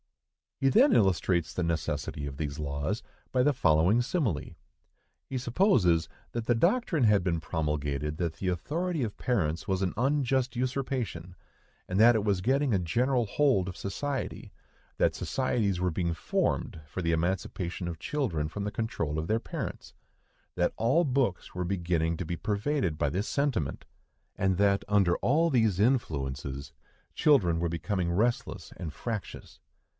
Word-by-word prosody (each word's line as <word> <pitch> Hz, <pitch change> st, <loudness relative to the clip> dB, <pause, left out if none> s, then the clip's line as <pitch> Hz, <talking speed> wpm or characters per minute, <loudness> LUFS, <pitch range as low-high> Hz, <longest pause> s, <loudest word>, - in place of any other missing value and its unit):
He 135 Hz, -, +3 dB
then 260 Hz, -, +5 dB
illustrates 90 Hz, -4 st, +2 dB
the 90 Hz, -, -1 dB
necessity 80 Hz, -3 st, -2 dB
of 70 Hz, -1 st, -7 dB
these 75 Hz, -1 st, -4 dB
laws 75 Hz, +7 st, -2 dB, 0.3 s
by 130 Hz, -, +2 dB
the 145 Hz, +3 st, +3 dB
following 90 Hz, -, +3 dB
simile. 120 Hz, -, -1 dB, 0.7 s
He 135 Hz, -, -3 dB
supposes 120 Hz, -, +3 dB, 0.3 s
that 115 Hz, -1 st, -3 dB
the 120 Hz, -, +3 dB
doctrine 170 Hz, -, +2 dB
had 105 Hz, -4 st, +4 dB
been 85 Hz, -2 st, 0 dB
promulgated 75 Hz, -2 st, -2 dB
that 85 Hz, -2 st, -1 dB
the 95 Hz, -, -5 dB
authority 155 Hz, -, -1 dB
of 105 Hz, -3 st, -4 dB
parents 85 Hz, -10 st, -1 dB
was 95 Hz, 0 st, 0 dB
an 95 Hz, -2 st, 0 dB
unjust 130 Hz, -1 st, +1 dB
usurpation, 125 Hz, -, -3 dB, 0.5 s
and 90 Hz, +2 st, -1 dB
that 120 Hz, +2 st, +8 dB
it 110 Hz, -, +1 dB
was 100 Hz, -3 st, +1 dB
getting 135 Hz, +3 st, +2 dB
a 95 Hz, -, +3 dB
general 120 Hz, +8 st, +1 dB
hold 110 Hz, -4 st, +2 dB
of 90 Hz, -, -6 dB
society; 135 Hz, +7 st, -4 dB, 0.5 s
that -, -, +2 dB
societies 110 Hz, -8 st, 0 dB
were 90 Hz, 0 st, +1 dB
being 85 Hz, 0 st, -1 dB
formed 80 Hz, +1 st, -1 dB
for 90 Hz, -, -5 dB
the 85 Hz, -, +1 dB
emancipation 85 Hz, +1 st, -2 dB
of 85 Hz, -1 st, -4 dB
children 85 Hz, -, -1 dB
from 100 Hz, +6 st, -5 dB
the 105 Hz, -, -2 dB
control 85 Hz, -10 st, -2 dB
of 80 Hz, -, -3 dB
their 110 Hz, +4 st, +2 dB
parents; -, -, -6 dB, 0.6 s
that -, -, +1 dB
all 130 Hz, +10 st, +3 dB
books 130 Hz, -, 0 dB
were 90 Hz, -, -1 dB
beginning 85 Hz, -3 st, 0 dB
to 90 Hz, -, -4 dB
be 85 Hz, -, -3 dB
pervaded 105 Hz, -, -1 dB
by 75 Hz, -, +2 dB
this 95 Hz, +9 st, -2 dB
sentiment; 135 Hz, -, -1 dB, 0.5 s
and 95 Hz, -1 st, +1 dB
that, 100 Hz, 0 st, +3 dB
under 100 Hz, -4 st, +3 dB
all 160 Hz, +6 st, +2 dB
these 110 Hz, -, +2 dB
influences, 70 Hz, -, -1 dB, 0.4 s
children 100 Hz, -, +4 dB
were 85 Hz, 0 st, 0 dB
becoming 85 Hz, +1 st, -1 dB
restless 115 Hz, +7 st, -1 dB
and 80 Hz, -4 st, -5 dB
fractious. 115 Hz, -4 st, -6 dB
100 Hz, 155 wpm, -29 LUFS, 85-125 Hz, 0.7 s, that